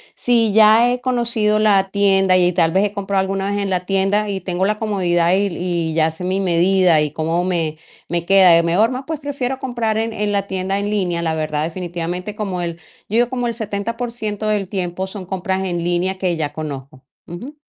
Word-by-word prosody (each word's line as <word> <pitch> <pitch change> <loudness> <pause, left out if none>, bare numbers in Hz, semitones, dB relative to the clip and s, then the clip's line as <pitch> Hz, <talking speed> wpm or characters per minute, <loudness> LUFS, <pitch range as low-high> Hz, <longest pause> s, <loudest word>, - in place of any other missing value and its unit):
si 230 -3 +2
ya 220 +3 +6
he 250 - -1
conocido 235 -4 +1
la 200 -3 +3
tienda 195 -2 +3
y 180 -1 +3
tal 165 -1 +2
vez 190 +4 +2
he 205 - -2
comprado 200 -1 -1
alguna 195 +1 -2
vez 205 - -1
en 200 - -2
la 185 -1 0
tienda, 195 +2 +1
y 195 -1 -2
tengo 180 +1 -1
la 210 +1 0
comodidad 180 -5 +1
y 200 +1 +1
y 170 -2 -2
ya 160 0 +2
sé 160 +3 -9
mi 190 +1 0
medida, 180 -1 +3
y 150 -1 -1
cómo 165 +3 -1
me 165 -4 -1 0.3
me 170 0 -2
queda, 185 -3 +6
mejor, 190 +8 +2
pues, 315 0 -4
prefiero 270 -3 -3
comprar 235 -4 -1
en 225 +1 -1
en 210 0 -2
la 200 -1 -1
tienda 190 +1 -2
en 205 0 -2
línea, 180 -5 -1
la 160 -1 -1
verdad, 155 -1 -2
definitivamente, 175 +3 -4
como 195 -4 -3
el, 170 -1 -3 0.3
yo 215 - -4
digo, 240 0 +3
como 245 -1 -2
el 235 - -2
70% 220 0 -4
del 210 -2 0
tiempo 185 -1 -3
son 190 -1 -8
compras 190 +1 -2
en 175 -2 -2
línea 175 +2 0
que 185 -2 0
ya 150 -2 -2
conozco, 140 -3 -7 0.2
ujú. 240 - -8
190 Hz, 205 wpm, -19 LUFS, 175-210 Hz, 0.3 s, ya